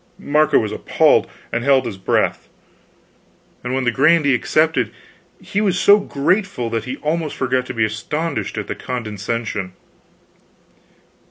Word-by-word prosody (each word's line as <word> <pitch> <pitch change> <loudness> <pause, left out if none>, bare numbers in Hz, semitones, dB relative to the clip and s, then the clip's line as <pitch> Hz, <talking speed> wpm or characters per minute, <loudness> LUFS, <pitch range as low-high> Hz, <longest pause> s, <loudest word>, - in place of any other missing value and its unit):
Marco 155 -5 +2
was 110 - 0
appalled, - - +2 0.2
and 115 - -1
held 135 -1 +3
his 105 -5 -6
breath; - - 0 1.1
and 125 +1 -2
when 130 - 0
the 120 - +2
grandee 145 +2 +3
accepted, 155 +6 +1 0.5
he 205 - -2
was 190 -4 +1
so 205 +1 +6
grateful 185 - -1
that 115 -1 -2
he 130 +2 -5
almost 155 0 -1
forgot 130 -1 -1
to - - -5
be 115 -1 +2
astonished 115 - -3
at - - -3
the - - -4
condescension. 110 -4 -4
130 Hz, 140 wpm, -19 LUFS, 115-155 Hz, 1.1 s, so